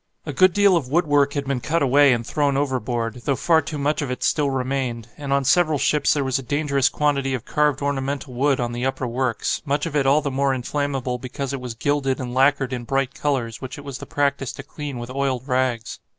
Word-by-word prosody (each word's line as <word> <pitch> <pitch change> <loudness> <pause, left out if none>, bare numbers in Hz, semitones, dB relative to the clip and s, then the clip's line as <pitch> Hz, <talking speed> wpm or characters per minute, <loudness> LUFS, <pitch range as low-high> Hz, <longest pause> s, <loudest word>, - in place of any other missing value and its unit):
A - - -4
good 185 0 +5
deal 200 0 +4
of 155 -7 0
woodwork 145 -3 +2
had 140 -1 -2
been 135 -2 -2
cut 165 +4 0
away 140 +1 +5
and 120 -1 0
thrown 145 0 0
overboard, 125 -4 -2
though 140 - +2
far 160 +3 +3
too 150 +1 -5
much 145 +2 0
of 145 - -3
it 125 - -4
still 145 -2 +2
remained, 130 -3 -2
and 140 -2 -6
on 140 -1 +2
several 155 +1 +3
ships 150 +2 +2
there 145 -2 +1
was 130 0 0
a - - -5
dangerous 140 0 +1
quantity 140 -3 0
of 125 - -7
carved 150 -2 +1
ornamental 140 -1 -2
wood 135 +2 +1
on 120 -1 -1
the 120 +1 -4
upper 135 0 -1
works, 125 0 -1
much 145 0 -1
of 160 -3 -4
it 140 -2 +2
all 145 +3 +4
the 140 -1 -2
more 135 0 +1
inflammable 130 -1 -2
because 130 +2 -5
it 135 - -4
was 125 -2 -6
gilded 135 +1 0
and 125 -2 -5
lacquered 135 0 +2
in 125 -1 -4
bright 135 +2 -1
colours 125 -7 -2
which 130 +1 -7
it 145 - -9
was 135 -2 -6
the - - -9
practice 140 -2 0
to - - -8
clean 145 -4 -6
with 120 +1 -6
oiled 135 -1 -2
rags. 125 -3 -1
135 Hz, 235 wpm, -22 LUFS, 125-145 Hz, -, good